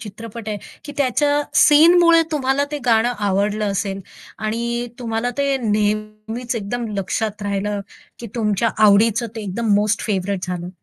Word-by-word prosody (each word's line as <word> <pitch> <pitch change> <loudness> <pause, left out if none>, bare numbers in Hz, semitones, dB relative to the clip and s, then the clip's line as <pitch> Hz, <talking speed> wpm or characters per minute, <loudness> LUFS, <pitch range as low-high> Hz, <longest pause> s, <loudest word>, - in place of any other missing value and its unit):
चित्रपट 220 +1 -8
आहे, 210 - -2 0.3
की 290 - -7
त्याच्या 290 +2 +2 0.2
सीनमुळे 335 +2 +6
तुम्हाला 275 -1 +1
ते 295 - -3
गाणं 235 +1 +3
आवडलं 205 +1 0
असेल 195 0 -3 0.4
आणि 235 +2 -2
तुम्हाला 235 0 -2
ते 280 -1 +1
नेहमीच 215 +3 -2
एकदम 230 +3 -3
लक्षात 210 +2 -2
राहिलं, 200 0 -2 0.4
की 235 - -7
तुमच्या 220 -1 +1
आवडीचं 220 +3 +4
ते 220 - -4
एकदम 205 +2 0
मोस्ट 210 +1 +1
फेव्हराइट 195 -2 -1
झालं, 180 -1 -4
220 Hz, 140 wpm, -20 LUFS, 205-245 Hz, 0.4 s, सीनमुळे